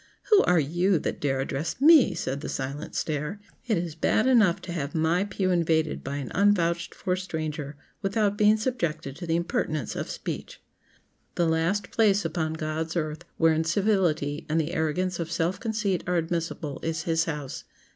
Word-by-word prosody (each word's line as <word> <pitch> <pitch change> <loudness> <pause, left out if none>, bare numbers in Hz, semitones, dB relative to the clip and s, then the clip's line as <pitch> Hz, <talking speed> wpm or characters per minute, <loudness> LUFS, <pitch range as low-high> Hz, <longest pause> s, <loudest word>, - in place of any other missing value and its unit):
"Who 420 - +8
are 180 -2 +4
you 175 +6 +2
that - - -3
dare 135 -2 0
address 140 - -3
me!" 285 - +7
said 140 -4 -3
the - - -5
silent 135 +2 -4
stare. 150 +5 -2 0.3
"It 220 -5 +2
is 170 -2 -3
bad 195 +8 +1
enough 225 -9 +4
to 180 - -6
have 150 -3 -4
my 165 +4 +2
pew 190 -2 -1
invaded 160 -3 +1
by 140 +1 -4
an 140 -3 -5
unvouched 175 -3 +2
for 180 -2 -1
stranger 155 -5 -4 0.3
without 205 +1 +1
being 210 +1 +4
subjected 175 - -2
to 175 - -7
the 165 - +1
impertinence 155 -5 -1
of - - -4
speech!" - - -6 0.8
The 175 - +2
last 165 +5 0
place 205 -4 +3
upon 160 -1 -1
God's 160 +1 -3
earth 155 0 -3
where 165 -1 +4
incivility 165 -3 +1
and 160 +2 +2
the 160 +2 -2
arrogance 175 +3 -1
of 165 -1 -3
self 170 +3 0
conceit 210 -5 -1
are 180 - +1
admissible 165 -3 -3
is 160 -1 -2
His 165 -1 +1
house. 150 -5 -5
165 Hz, 175 wpm, -26 LUFS, 155-190 Hz, 0.8 s, Who